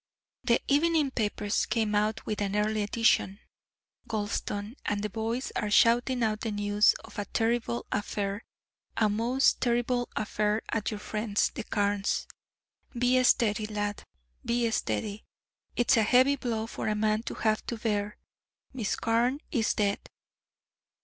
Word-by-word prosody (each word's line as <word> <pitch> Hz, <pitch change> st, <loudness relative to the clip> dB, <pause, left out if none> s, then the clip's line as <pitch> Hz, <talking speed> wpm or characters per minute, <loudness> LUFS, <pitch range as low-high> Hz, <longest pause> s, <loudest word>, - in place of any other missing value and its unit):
"The 235 Hz, -1 st, +3 dB
evening 300 Hz, 0 st, +3 dB
papers 210 Hz, -3 st, -1 dB
came 220 Hz, -2 st, 0 dB
out 215 Hz, +1 st, 0 dB
with 210 Hz, -1 st, -3 dB
an 200 Hz, 0 st, -1 dB
early 210 Hz, +1 st, +1 dB
edition, 205 Hz, -2 st, +2 dB, 0.7 s
Gulston, 205 Hz, 0 st, -3 dB
and 205 Hz, 0 st, -2 dB
the 210 Hz, -, -3 dB
boys 230 Hz, +4 st, -3 dB
are 210 Hz, -, -1 dB
shouting 240 Hz, +3 st, +4 dB
out 215 Hz, -1 st, 0 dB
the 225 Hz, -, -2 dB
news 205 Hz, 0 st, +3 dB
of -, -, -9 dB
a 205 Hz, -, -2 dB
terrible 235 Hz, +3 st, -1 dB
affair, 205 Hz, 0 st, -2 dB, 0.5 s
a 215 Hz, -, +4 dB
most 235 Hz, +6 st, +2 dB
terrible 245 Hz, 0 st, 0 dB
affair 210 Hz, +1 st, 0 dB
at 225 Hz, -2 st, -1 dB
your 215 Hz, -, -5 dB
friends 210 Hz, 0 st, -1 dB
the 235 Hz, -, -5 dB
Carnes'. 205 Hz, -1 st, 0 dB, 0.7 s
Be 250 Hz, +1 st, +3 dB
steady, 215 Hz, -3 st, +2 dB
lad, 205 Hz, -1 st, -3 dB, 0.4 s
be 235 Hz, -1 st, 0 dB
steady. 200 Hz, -, -2 dB, 0.5 s
It's 240 Hz, +2 st, +3 dB
a -, -, +5 dB
heavy 255 Hz, +6 st, +4 dB
blow 230 Hz, -4 st, -2 dB
for 225 Hz, -, -5 dB
a 215 Hz, -, +1 dB
man 215 Hz, 0 st, +1 dB
to -, -, -6 dB
have 215 Hz, -1 st, 0 dB
to 235 Hz, -, -3 dB
bear. 210 Hz, -2 st, -2 dB, 0.6 s
Miss 230 Hz, -6 st, -1 dB
Carne 235 Hz, +4 st, +1 dB
is 230 Hz, -5 st, +1 dB
dead." 200 Hz, -1 st, +1 dB
220 Hz, 145 wpm, -28 LUFS, 205-235 Hz, 0.7 s, a